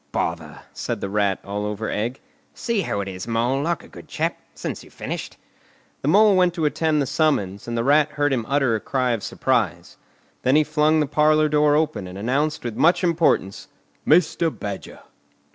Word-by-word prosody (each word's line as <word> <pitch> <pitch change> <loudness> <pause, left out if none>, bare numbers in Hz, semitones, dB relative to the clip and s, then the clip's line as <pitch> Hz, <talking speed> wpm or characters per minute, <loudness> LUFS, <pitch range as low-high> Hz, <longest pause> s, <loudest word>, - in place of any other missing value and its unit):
"Bother!" 80 -3 -3
said - - -4
the 100 - -4
Rat, 100 -2 +1
all 100 +1 -3
over 105 +1 -3
egg. 120 +5 -3 0.3
"See 230 -4 -1
who 100 - -2
it 100 - -5
is, 95 +2 -6
Mole, 120 +4 0
like 170 +1 -1
a - - -14
good - - -13
chap, - - -2 0.2
since - - -5
you've - - -18
finished." - - -6 0.6
The - - -3
Mole 205 +5 +5
went 180 -2 +3
to 165 -3 -1
attend 155 +1 +1
the - - -2
summons, 130 - 0
and 120 0 -3
the 115 - 0
Rat 150 +3 +3
heard 145 -1 +1
him 120 -3 0
utter 135 -4 +2
a - - -1
cry 130 +2 -1
of 115 -3 -1
surprise. - - -1 0.4
Then 130 +2 +2
he 155 - +5
flung 155 +1 +2
the - - +2
parlour 155 +1 +3
door 150 0 +3
open, 150 -11 -1
and 90 +1 -9
announced 140 +9 -1
with 120 -3 -4
much 175 +4 +3
importance, 165 - +1 0.4
"Mr. 165 0 +3
Badger!" 100 -9 -7
140 Hz, 195 wpm, -22 LUFS, 105-155 Hz, 0.6 s, Mole